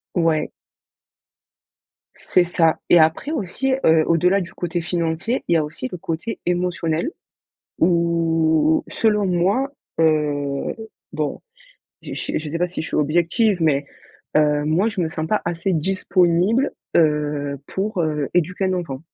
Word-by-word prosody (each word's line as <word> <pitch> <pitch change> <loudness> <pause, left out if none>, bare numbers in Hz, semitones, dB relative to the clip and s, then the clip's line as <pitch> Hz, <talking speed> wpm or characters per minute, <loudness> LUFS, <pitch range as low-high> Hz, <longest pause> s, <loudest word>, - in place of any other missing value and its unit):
Ouais. 165 -3 +1 1.7
C'est 180 - +2
ça 165 -2 +2
et 175 - +7
après 160 - +2
aussi, 260 - -1
heu, 160 0 +5
au-delà 180 +4 +3
du 185 -1 -6
côté 175 0 -3
financier, 170 +7 -1
il 170 - +3
y - - +5
a 155 - +1
aussi 150 -4 -5
le 180 - -5
côté 165 +7 -4
émotionnel, 175 - -1 0.7
où 165 -2 +2
selon 210 -3 +1
moi, 195 +10 +1 0.3
heu, 145 -3 0 0.4
bon 155 -2 -2 0.6
je - - -7
je 155 -1 -3
sais 165 - -3
pas, 180 +1 0
si 180 - -4
je - - -5
suis - - -3
objective, 175 - +2
mais, 145 -2 +2 0.5
heu, 150 -1 +3
moi 170 +8 +2
je 220 -4 -3
me 165 - 0
sens 160 0 -4
pas 215 +5 +1
assez 175 +3 -1
disponible, 185 - +2 0.2
heu, 150 -3 +1
pour, 195 0 -2
heu, 150 -3 -1
éduquer 180 +2 +1
un 185 - 0
enfant. 145 -7 -4
170 Hz, 145 wpm, -21 LUFS, 155-185 Hz, 1.7 s, et